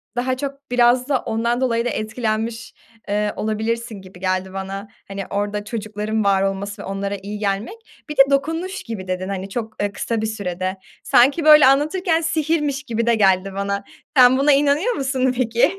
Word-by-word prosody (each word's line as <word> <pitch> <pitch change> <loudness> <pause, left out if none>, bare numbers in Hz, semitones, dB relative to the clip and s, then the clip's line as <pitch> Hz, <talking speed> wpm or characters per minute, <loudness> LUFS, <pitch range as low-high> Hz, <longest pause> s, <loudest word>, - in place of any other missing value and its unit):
daha 255 +1 -1
çok 280 -1 -7
biraz 245 +1 +3
da 270 -3 +2
ondan 235 +3 -1
dolayı 235 -2 +1
da - - +1
etkilenmiş, 220 +1 -3 0.3
eee, 210 +1 0
olabilirsin 220 0 -3
gibi 185 -1 -14
geldi 185 0 -2
bana. 195 +1 -5 0.2
Hani, 195 0 -5
orada 205 +1 -2
çocukların 215 -1 -3
var 195 -1 +3
olması 195 +1 -3
ve - - -8
onlara 195 +1 -3
iyi 210 +1 -6
gelmek. 200 - -2 0.3
Bir 300 - -6
de - - +9
dokunuş 325 +8 -1
gibi 205 -5 -6
dedin, 185 +1 -3
hani, 195 0 -4
çok, 220 0 -5
eee, 205 0 0
kısa 225 +2 -2
bir 220 - -1
sürede. 185 -3 -3 0.3
Sanki, 280 +6 +4
böyle, 300 -2 +9
anlatırken 320 +5 +2
sihirmiş 310 -3 0
gibi 230 -4 -2
de 235 - +4
geldi 195 -2 +2
bana. 200 0 -2 0.3
Sen 255 0 +7
buna 280 +2 +4
inanıyor 290 - +3
musun 265 - 0
peki, 235 -2 +2
225 Hz, 175 wpm, -21 LUFS, 200-265 Hz, 0.3 s, de